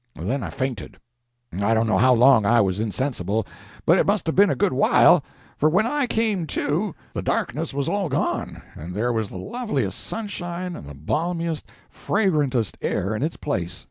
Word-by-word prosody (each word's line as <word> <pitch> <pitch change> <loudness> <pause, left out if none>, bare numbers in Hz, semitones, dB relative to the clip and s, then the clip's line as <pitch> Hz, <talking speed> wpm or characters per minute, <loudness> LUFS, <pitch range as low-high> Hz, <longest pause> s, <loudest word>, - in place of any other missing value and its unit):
Then 135 +2 -2
I - - -4
fainted. 130 -6 -4 0.6
I 100 +5 +1
don't 110 +1 +2
know 110 - +2
how 130 0 +5
long 125 -1 +6
I 115 +4 +4
was 95 -2 +1
insensible, 110 -2 -1 0.4
but - - +5
it - - +2
must 205 -1 +1
have 160 - -1
been 200 +1 +6
a - - +1
good 205 -6 +1
while, 140 +4 +5 0.4
for, 155 - +4
when 190 +7 +2
I 285 +2 0
came 215 -7 0
to, 165 +7 -1 0.2
the - - -3
darkness 150 +7 -1
was 140 -1 -2
all 200 -4 -1
gone 140 - -2
and 85 +4 -8
there 120 +4 0
was 110 -3 -1
the - - -8
loveliest 235 - -3
sunshine 180 -4 -5
and 70 - -9
the 70 - -9
balmiest, 165 - -2 0.2
fragrantest 145 - 0
air 100 +4 -1
in 110 - -3
its 155 +3 -2
place. 90 - -3
140 Hz, 185 wpm, -23 LUFS, 110-180 Hz, 0.6 s, long